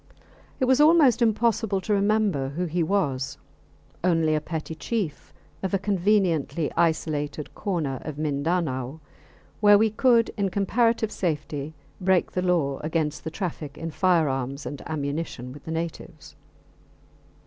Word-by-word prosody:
It 260 - +2
was 260 +2 +4
almost 300 -6 +6
impossible 220 -2 +2
to 210 - -1
remember 200 -9 +1
who 170 +6 -2
he 175 +1 -1
was 140 -7 0 0.7
only 165 -3 +3
a 155 - +1
petty 160 +1 -5
chief 175 -1 -4 0.3
of 190 +1 -1
a - - +3
conveniently 185 -5 +1
isolated 155 -3 -1
corner 160 -10 -2
of 155 -2 -6
Mindanao, 150 -2 -1 0.6
where 205 -1 +7
we 220 +1 +3
could 235 0 +3
in 200 -2 +1
comparative 220 +3 +1
safety 155 -3 -3 0.3
break 185 -1 +2
the 180 - -1
law 165 -7 +1
against 155 -1 -2
the 160 - -3
traffic 160 -4 -5
in 165 +1 -5
firearms 145 -6 +1
and 145 - -6
ammunition 140 -4 -4
with 145 - -13
the 160 - -5
natives. 165 -1 -6
165 Hz, 135 wpm, -25 LUFS, 150-200 Hz, 0.7 s, where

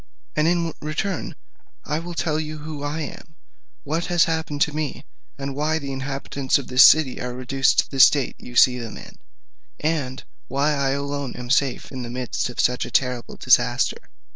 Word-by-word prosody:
And, 155 +1 +2
in 170 -2 +1
return, 155 +4 -3 0.5
I 150 +1 -1
will 170 +1 -7 0.2
you 155 0 -5
who 150 -1 -7
I 145 +2 -3
am, 160 +1 -8 0.5
what 160 +4 -2
has 175 -2 +4
happened 160 -3 -2
to 150 - +3
me, 155 -2 -4 0.3
why 145 +3 -1
the 140 -3 -5
inhabitants 135 0 -1
of 140 - -6
this 125 +1 +7
city 150 -4 +5
are 125 0 -4
reduced 135 +1 +1
to - - -15
the 135 - -4
state 135 +1 +5
you 125 - -11
see 125 +1 +5
them 115 -2 -7
in, - - -12 0.6
and 145 -4 -2 0.2
why 140 +3 +1
I 140 -2 0
alone 140 -2 -3
am 125 0 -6
safe 135 -2 +1
in 130 -2 -5
the 120 - -6
midst 125 0 -3
of 125 - -9
such 125 0 +2
a - - -5
terrible 125 -2 -1
disaster." - - +2
140 Hz, 180 wpm, -23 LUFS, 130-155 Hz, 0.6 s, this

